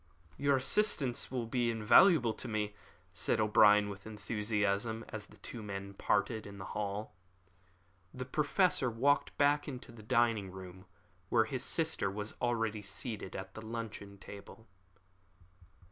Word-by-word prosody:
"Your 140 Hz, 0 st, +2 dB
assistance 135 Hz, -, +1 dB
will 125 Hz, -2 st, -2 dB
be 120 Hz, +1 st, 0 dB
invaluable 115 Hz, -, +5 dB
to 130 Hz, -, -7 dB
me," 105 Hz, -2 st, -2 dB, 0.4 s
said 90 Hz, -, 0 dB
O'Brien, 105 Hz, -1 st, +5 dB
with 100 Hz, 0 st, -8 dB
enthusiasm, 105 Hz, +1 st, -1 dB
and 110 Hz, -, -5 dB
the -, -, -13 dB
two 120 Hz, -, -8 dB
men 100 Hz, -1 st, -6 dB
parted 105 Hz, +2 st, 0 dB
in 100 Hz, 0 st, -10 dB
the 95 Hz, -, -7 dB
hall. 105 Hz, +1 st, -3 dB, 1.0 s
The 130 Hz, 0 st, -6 dB
Professor 150 Hz, 0 st, +2 dB
walked 135 Hz, +6 st, +1 dB
back 145 Hz, +1 st, +3 dB
into 125 Hz, -4 st, -7 dB
the 115 Hz, -2 st, -12 dB
dining 115 Hz, -3 st, +1 dB
room, 95 Hz, 0 st, -10 dB, 0.4 s
where 110 Hz, -2 st, +4 dB
his 125 Hz, +2 st, -3 dB
sister 160 Hz, -12 st, 0 dB
was 105 Hz, +2 st, -4 dB
already 115 Hz, -3 st, 0 dB
seated 105 Hz, 0 st, -3 dB
at 95 Hz, 0 st, -6 dB
the 110 Hz, -, -8 dB
luncheon 110 Hz, -3 st, -6 dB
table. 100 Hz, +3 st, -11 dB
110 Hz, 140 wpm, -33 LUFS, 100-125 Hz, 1.0 s, invaluable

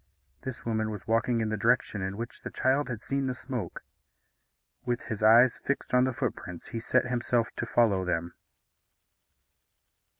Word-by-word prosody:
This 130 Hz, -2 st, -6 dB
woman 110 Hz, -1 st, 0 dB
was 105 Hz, -3 st, -6 dB
walking 115 Hz, +1 st, +1 dB
in 110 Hz, -, 0 dB
the 110 Hz, -, -1 dB
direction 100 Hz, 0 st, +1 dB
in 95 Hz, +1 st, -3 dB
which 120 Hz, +1 st, -6 dB
the -, -, -5 dB
child 135 Hz, +2 st, +1 dB
had 120 Hz, -4 st, -5 dB
seen 135 Hz, 0 st, -1 dB
the 130 Hz, -, -2 dB
smoke. 105 Hz, -, -5 dB, 1.0 s
With 120 Hz, -1 st, -2 dB
his 110 Hz, -2 st, -5 dB
eyes 115 Hz, +3 st, +6 dB
fixed 140 Hz, -, -2 dB
on 125 Hz, 0 st, +5 dB
the 130 Hz, -, 0 dB
footprints, 90 Hz, -, -4 dB
he 115 Hz, -, -4 dB
set 130 Hz, +3 st, +2 dB
himself 120 Hz, -1 st, 0 dB
to -, -, -2 dB
follow 105 Hz, -6 st, +3 dB
them. 85 Hz, -1 st, -2 dB
115 Hz, 165 wpm, -29 LUFS, 105-125 Hz, 1.0 s, eyes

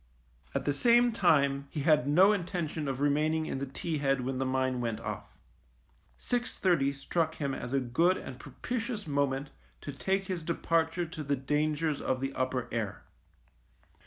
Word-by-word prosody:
At -, -, -1 dB
the 145 Hz, -, +2 dB
same 240 Hz, +9 st, +4 dB
time 140 Hz, -9 st, +2 dB
he 150 Hz, -, -4 dB
had 150 Hz, -3 st, +3 dB
no 185 Hz, +8 st, +6 dB
intention 170 Hz, -5 st, -3 dB
of 135 Hz, 0 st, -3 dB
remaining 155 Hz, +2 st, +2 dB
in 135 Hz, -, -3 dB
the 140 Hz, -, -3 dB
T 155 Hz, +3 st, -3 dB
head 135 Hz, -2 st, +1 dB
when 130 Hz, +1 st, -2 dB
the 135 Hz, -, 0 dB
mine 130 Hz, -1 st, 0 dB
went 115 Hz, -2 st, -2 dB
off. -, -, -7 dB, 0.8 s
Six 245 Hz, -, -2 dB
thirty 160 Hz, -7 st, +3 dB
struck 160 Hz, +4 st, -1 dB
him 140 Hz, -2 st, -2 dB
as 125 Hz, -, -5 dB
a 135 Hz, -, +2 dB
good 165 Hz, +9 st, +2 dB
and 130 Hz, -1 st, -8 dB
propitious 230 Hz, -, -4 dB
moment 140 Hz, -1 st, -1 dB, 0.3 s
to 145 Hz, -, -5 dB
take 190 Hz, +8 st, -1 dB
his 185 Hz, -2 st, -3 dB
departure 165 Hz, +1 st, 0 dB
to 160 Hz, -2 st, -6 dB
the 140 Hz, 0 st, 0 dB
dangers 150 Hz, +2 st, 0 dB
of 130 Hz, -, 0 dB
the 135 Hz, +1 st, -3 dB
upper 130 Hz, -1 st, -1 dB
air. 105 Hz, -4 st, -3 dB
145 Hz, 170 wpm, -30 LUFS, 135-170 Hz, 0.8 s, no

